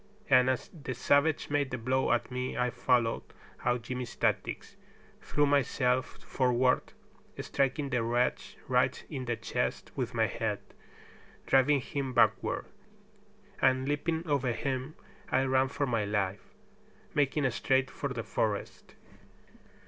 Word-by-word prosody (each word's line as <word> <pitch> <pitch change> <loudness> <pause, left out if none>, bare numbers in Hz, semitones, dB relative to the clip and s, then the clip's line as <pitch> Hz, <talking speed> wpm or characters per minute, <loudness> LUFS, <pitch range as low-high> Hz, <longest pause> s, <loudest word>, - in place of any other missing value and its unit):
And 130 0 +6
as 130 - -1
the 145 -7 -6
savage 145 +5 +2
made 145 -2 +1
the 125 - -3
blow 130 +3 +1
at 120 +1 0
me 125 0 -3
I 125 0 +1
followed 120 -2 +1 0.4
out 120 -1 +1
Jimmy's 125 +1 -5
tactics, - - -1 0.5
threw 145 - +1
myself 130 -2 +1
forward, 125 -1 +1 0.5
striking 140 +1 -1
the 125 -2 +1
wretch 120 +2 0
right - - +1
in 130 - -4
the 120 -1 -1
chest 110 - -3
with - - -3
my - - +3
head, - - -2 0.9
driving 135 +1 +4
him 135 +1 -3
backward, 115 -3 +2 1.0
and 130 0 +3
leaping 160 +3 -1
over 135 -5 +1
him 130 +3 -3 0.4
I 130 - +3
ran 130 0 +3
for 145 +2 -1
my 115 -5 0
life, 100 -1 -2 0.6
making 145 -1 +2
straight 130 +3 +1
for 140 - -4
the 120 -3 -4
forest. 105 -2 -3
130 Hz, 135 wpm, -30 LUFS, 120-140 Hz, 1.0 s, And